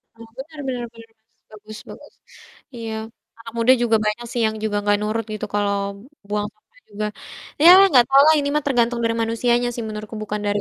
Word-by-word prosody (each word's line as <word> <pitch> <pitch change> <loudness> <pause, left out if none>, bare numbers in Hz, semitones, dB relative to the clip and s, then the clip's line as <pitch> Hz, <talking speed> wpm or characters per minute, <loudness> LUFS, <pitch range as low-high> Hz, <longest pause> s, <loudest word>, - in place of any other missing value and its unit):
Oh, 230 - -13
bener 305 +3 -10
bener 250 -2 -3
bener 230 0 -15
Mas, 220 - -49 0.3
bagus 215 0 -12
bagus. - - -13 0.6
Iya, 225 -1 -6 0.5
anak 230 0 -11
muda 235 +3 +5
juga 230 -2 +3
banyak 210 +3 -2
sih 240 - -2
yang 220 0 -1
juga 210 -1 -1
nggak 205 0 +2
nurut 215 +1 -2
gitu, 215 - -4
kalau 205 -1 0 0.5
buang 210 0 -2
sampah 475 - -29
juga, 210 +1 -4 0.6
ya 340 - +9 0.2
nggak 250 -6 +5
tau 270 +1 +6
lah 315 - +7
ini 285 - -2
mah 300 - +1
tergantung 240 -2 +1
dari 230 0 0
manusianya 240 +2 0
sih 235 -1 -5
menurutku 215 0 -7
bukan 210 0 -4
dari, 205 0 0
230 Hz, 200 wpm, -21 LUFS, 215-245 Hz, 0.6 s, ya